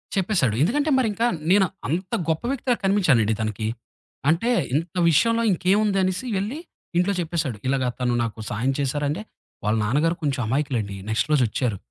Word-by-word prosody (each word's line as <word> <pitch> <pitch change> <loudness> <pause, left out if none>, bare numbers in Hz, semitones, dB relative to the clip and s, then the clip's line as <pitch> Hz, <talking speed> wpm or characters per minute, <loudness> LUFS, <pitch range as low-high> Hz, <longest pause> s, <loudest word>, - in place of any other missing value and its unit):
చెప్పేశాడు. 175 - +1
ఎందుకంటే, 285 - +1
మరింకా 225 -1 +1 0.3
నేను 195 0 +5 0.2
అంత 180 +6 -3 0.2
గొప్ప 160 -1 0
వ్యక్తిలా 255 -2 0
కనిపించానండి 150 - +3
తనకి. 110 0 -2 0.6
అంటే 175 +10 +2 0.2
ఇంత 160 +2 -1 0.2
విషయంలో 230 +8 +3
ఇంకేముందనేసి 190 +2 +1
వెళ్ళి 215 +10 -3 0.4
ఇంట్లో 180 +3 +2
చెప్పేశాడు. 160 -9 -2
ఇలాగ 130 0 +1 0.2
తను 125 -1 +1
నాకు 115 -1 -5
సహాయం 120 +6 0
చేశారంటే, 145 +6 -1 0.4
వాళ్ళ 105 +1 +1
నాన్నగారు 150 +9 +1
కొంచెం 140 -3 0
అమాయకులండి. 120 -6 -1
నెక్స్ట్ 110 +6 0
రోజు 135 - +4
వచ్చారు. 115 -3 -1
160 Hz, 140 wpm, -23 LUFS, 125-195 Hz, 0.6 s, నేను